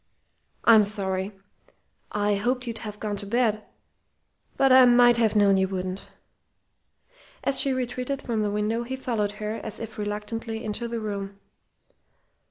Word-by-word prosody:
"I'm 220 -2 +7
sorry! 195 -1 -2 0.8
I 205 0 +1
hoped 245 +5 -1
you'd 230 -2 -5
have 210 -2 -8
gone 210 -1 -3
to 200 0 -4
bed. 220 -1 +1 0.9
But 270 -1 +4
I 260 0 +9
might 240 -1 +6
have 225 -2 +2
known 200 -2 +5
you 190 0 +2
wouldn't." 185 0 -5 1.4
As 275 - +2
she 275 - +3
retreated 255 +1 -2
from 230 -5 -2
the 210 - 0
window, 210 +3 -1
he 250 +2 -4
followed 225 -6 -2
her, 210 +1 -4
as 220 -1 -7
if 220 -1 -7
reluctantly, 220 +2 -4
into 215 +3 -3
the 235 0 -3
room. 200 -2 -5
215 Hz, 150 wpm, -25 LUFS, 205-240 Hz, 1.4 s, I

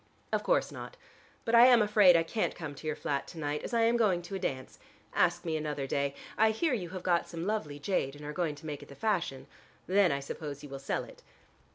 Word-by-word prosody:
"Of - - +2
course - - +1
not. - - -8 0.5
But 230 - -1
I 235 +1 +9
am 245 -2 +7
afraid 205 -4 +6
I 165 - +2
can't 215 +6 -1
come 155 -4 -6
to 150 +3 -9
your 155 - -1
flat 140 -2 -2
to 170 - -11
night, 150 -1 -2
as - - -5
I 235 -1 +2
am 230 +1 +4
going 190 -7 +2
to 175 - -9
a 195 - -2
dance. 130 -8 -4 0.3
Ask 175 0 +2
me 160 -2 -1
another 150 -3 -2
day. 140 +1 -1 0.2
I 220 0 +6
hear 265 +7 0
you 185 -8 -2
have 185 0 -7
got 175 -2 +2
some 170 0 -5
lovely 195 -9 -2
jade 145 -3 -1
and 145 0 -10
are 150 - -5
going 160 -3 -1
to 145 - -14
make 150 -2 -5
it - - -13
the 140 - -11
fashion. 175 -11 -1 0.4
Then 190 -2 +4
I 140 - 0
suppose 145 0 -6
you 145 - -9
will 135 0 -6
sell 135 - -2
it." - - -14
170 Hz, 250 wpm, -31 LUFS, 145-210 Hz, 0.5 s, I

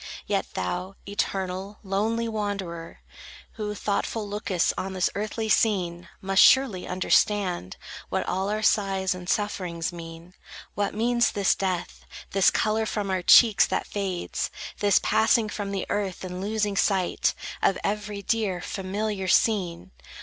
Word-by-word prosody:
Yet - - -1
thou, 180 - -3
eternal, 195 0 -3
lonely 220 +4 0
wanderer, 200 -6 -4 0.5
Who, 210 -1 -4
thoughtful, 210 +1 -2
lookest 200 -3 0
on 190 0 -4
this 185 -1 +1
earthly 215 +2 -3
scene, 185 -5 +1
Must 195 0 +3
surely 265 -9 +5
understand 185 - +1 0.3
What - - -1
all 190 +2 -1
our 215 +1 -2
sighs 195 -3 +2
and 180 0 -8
sufferings 180 -5 -1
mean; 165 +1 -10 0.4
What 205 0 -2
means 235 +2 +2
this 200 -2 +3
death, 185 -3 -3 0.3
This 195 -1 +5
color 220 +1 0
from 205 -3 -2
our 185 -1 0
cheeks 220 +3 +7
that - - -1
fades, 195 -3 -3 0.3
This 205 -2 +4
passing 220 0 +3
from 205 -1 -4
the 195 -2 -2
earth, 195 -3 -2
and 180 0 -5
losing 210 0 -1
sight 190 -3 +1 0.3
Of 195 - +3
every 205 0 -3
dear, 210 -6 0
familiar 195 +2 -3
scene. 180 - +1
195 Hz, 135 wpm, -26 LUFS, 185-210 Hz, 0.5 s, cheeks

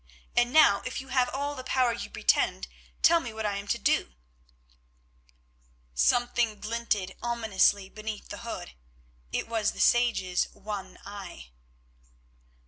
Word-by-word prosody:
"And 240 0 +3
now, 290 -9 +6
if 255 - -4
you 265 0 -10
have 255 -1 +2
all 285 +2 -3
the 260 -3 -7
power 255 -2 +2
you 230 - -6
pretend, - - +1 0.4
tell 335 0 +7
me 245 -8 -6
what 220 0 -5
I 205 -1 -1
am 200 0 -7
to - - +1
do." 60 - 0 1.8
Something 235 - +2
glinted 215 -4 -2
ominously 220 -4 +2
beneath 215 +1 -7
the - - -7
hood, - - -6 0.6
it - - -2
was 225 -2 0
the - - -11
sage's 230 -7 +3
one 200 -3 -7
eye. 195 - -9
220 Hz, 135 wpm, -28 LUFS, 200-245 Hz, 1.8 s, tell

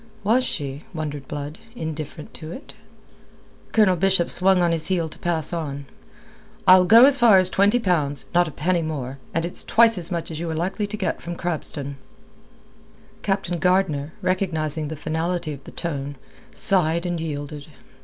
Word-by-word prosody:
Was 230 +5 +3
she, 140 - -4
wondered 145 -3 -5
Blood, 145 +1 -6 0.2
indifferent 155 - -6
to 155 +1 -9
it? 265 - -10 1.0
Colonel 210 -5 +4
Bishop 185 0 +2
swung 185 +1 +4
on 170 - +2
his 160 -2 -1
heel 175 -4 0
to 155 - -10
pass 165 -2 0
on. 145 -4 -4 0.8
"I'll 185 0 +7
go 230 +6 +8
as 280 0 +6
far 230 -5 +7
as 185 0 +5
twenty 200 +4 +3
pounds. 160 -10 0
Not 175 0 +4
a - - -6
penny 170 +4 0
more, 140 -4 -5
and 165 +1 -1
it's 175 - 0
twice 230 -3 +4
as 170 - -3
much 170 -2 -3
as 155 - -5
you 170 0 -3
are 160 - -3
like 175 +4 -2
to 210 0 -3
get 200 - -2
from 175 0 -6
Crabston." 145 -5 -4 1.2
Captain 185 -3 -1
Gardner, 170 -5 +1
recognizing 160 -5 -1
the 160 - -5
finality 160 +2 -2
of 140 -1 -11
the - - -10
tone, 145 -4 -4 0.4
sighed 170 -2 +1
and 175 -2 -2
yielded. 145 -2 -6
170 Hz, 170 wpm, -23 LUFS, 150-185 Hz, 1.2 s, go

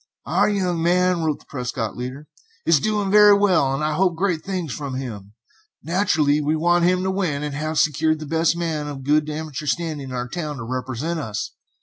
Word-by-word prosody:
"Our - - +2
young 180 -5 0
man," 180 +1 +2
wrote 155 -2 -1
the - - -22
Prescott 125 -4 -4
leader, 130 +4 -6 0.4
"is 165 -3 +5
doing 205 +3 0
very 210 -1 +7
well, 185 -9 +3
and 135 +2 -2
I 155 0 0
hope 180 +1 +2
great 175 -2 -1
things 185 -7 -3
from 140 -3 -5
him. 105 -6 -6 0.5
Naturally 155 -3 +2
we 150 +2 +1
want 175 +2 +3
to 185 +1 +2
win, 170 -7 -1
and 150 -1 -3
have 155 +2 -3
secured 155 +2 +2
the 155 - -7
best 160 +2 +1
man 160 -3 -2
of 140 -2 -6
good 150 +2 +2
amateur 150 -1 -5
standing 155 -5 -2
in 130 - -5
our 125 0 -3
town 150 +1 -4
to 120 - -6
represent 130 +7 -3
us. 110 -6 -4
155 Hz, 200 wpm, -22 LUFS, 140-175 Hz, 0.5 s, very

